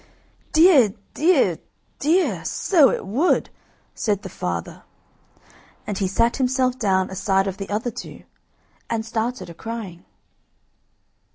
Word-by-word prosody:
"Dear, 310 - +5 0.2
dear, 290 - +3 0.4
dear! 290 - +1
so 300 - +3
it - - -3
would!" 255 - +1 0.4
said 205 -3 -1
the 190 - -6
father, 85 - -5 1.0
and 205 -2 -4
he 195 - +1
sat 230 +5 +1
himself 255 -1 +1
down 190 -4 +1
aside 195 0 +1
of 195 -1 -4
the 195 - -6
other 220 +4 -2
two, - - -9 0.7
and 225 -1 -2
started 230 -2 -3
a 170 - -9
crying. 205 -2 -7
220 Hz, 120 wpm, -22 LUFS, 190-255 Hz, 1.0 s, Dear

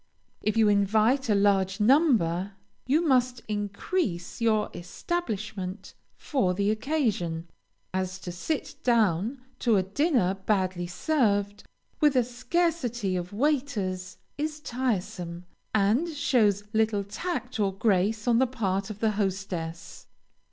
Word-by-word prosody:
If 215 +1 0
you 220 -1 +5
invite 215 +6 +3
a 210 - +4
large 195 -1 +2
number, 210 - +3 0.3
you 310 +6 +3
must 250 -3 +2
increase 205 - -2
your 220 -2 +2
establishment 195 - -4 0.2
for 190 -11 0
the 200 +2 +1
occasion, 215 - -1 0.5
as 185 0 -2
to 180 - -5
sit 275 - -3
down 225 +1 +2 0.2
to 235 -3 +3
a 190 - +2
dinner 235 - +1
badly 185 -4 +1
served, 205 - 0 0.4
with 295 -2 +4
a 250 - +5
scarcity 245 - -1
of 180 0 -3
waiters, 205 -8 -1 0.2
is 305 0 -2
tiresome, 185 - -3 0.3
and 220 +11 +2
shows 225 - +2
little 220 -2 +2
tact 255 - -4
or 200 -2 +2
grace 205 +2 +1
on 235 -1 +4
the 260 - +4
part 200 -5 -2
of 215 -1 -8
the 220 -1 +3
hostess. 190 -5 -4
210 Hz, 125 wpm, -27 LUFS, 190-255 Hz, 0.5 s, you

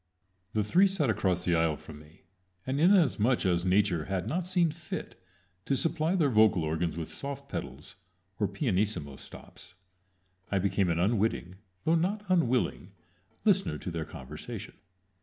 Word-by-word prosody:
The 110 - +1
three 180 - +4
sat 165 -11 +1
across 90 -4 0
the 90 - +2
aisle 80 -2 +2
from 75 +1 -11
me, 75 +5 -18 0.4
and 130 +2 -1
inasmuch 150 - +4
as 90 -2 +2
Nature 90 -3 +2
had 95 -2 -2
not 175 +2 -2
seen 175 -3 +2
fit 165 +2 -6 0.5
to 140 - +1
supply 160 +4 +1
their 155 -7 +2
vocal 105 -6 +4
organs 80 +2 -1
with 80 -2 -4
soft 140 0 -6
pedals, 70 - -7 0.4
or 105 - +2
pianissimo 95 - -1
stops, 90 +1 -12 0.8
I 100 - +2
became 95 -1 +1
an 85 - +1
unwitting, 95 -2 0 0.3
though 160 - +2
not 195 +6 0
unwilling, 125 - +1 0.5
listener 195 -2 +2
to 90 - -6
their 80 -2 -3
conversation. 65 -5 -8
105 Hz, 150 wpm, -29 LUFS, -, 0.8 s, three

